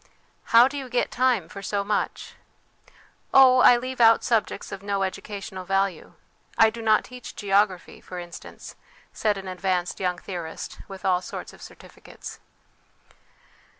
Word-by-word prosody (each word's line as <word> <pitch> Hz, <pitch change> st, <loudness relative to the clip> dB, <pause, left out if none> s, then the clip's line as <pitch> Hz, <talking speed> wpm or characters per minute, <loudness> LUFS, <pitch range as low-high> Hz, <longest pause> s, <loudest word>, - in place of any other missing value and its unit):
' -, -, -39 dB
How 235 Hz, +2 st, +9 dB
do 285 Hz, +1 st, -5 dB
you 265 Hz, -2 st, -8 dB
get 245 Hz, 0 st, 0 dB
time 245 Hz, -8 st, +1 dB
for 200 Hz, -, -9 dB
so 200 Hz, 0 st, -2 dB
much? 205 Hz, +1 st, -2 dB, 0.4 s
' -, -, -28 dB
' -, -, -38 dB
Oh, 260 Hz, -1 st, +8 dB
I 245 Hz, -1 st, +7 dB
leave 255 Hz, +1 st, -4 dB
out 225 Hz, 0 st, +6 dB
subjects 225 Hz, -4 st, -1 dB
of 190 Hz, -, -6 dB
no 200 Hz, -1 st, -1 dB
educational 190 Hz, 0 st, -6 dB
value; 195 Hz, -2 st, -1 dB, 0.4 s
I 220 Hz, 0 st, +6 dB
do 230 Hz, +1 st, -8 dB
not 215 Hz, -1 st, +3 dB
teach 250 Hz, -1 st, -10 dB
geography, 195 Hz, -2 st, 0 dB
for 180 Hz, -, -9 dB
instance/ 175 Hz, -1 st, -10 dB, 0.4 s
said 210 Hz, -2 st, 0 dB
an 195 Hz, -1 st, -8 dB
advanced 185 Hz, -1 st, -2 dB
young 180 Hz, -1 st, -1 dB
theorist 175 Hz, -3 st, -7 dB
with 195 Hz, -1 st, -10 dB
all 180 Hz, -1 st, +2 dB
sorts -, -, -8 dB
of -, -, -16 dB
certificates. -, -, -12 dB
200 Hz, 160 wpm, -25 LUFS, 185-235 Hz, 0.4 s, How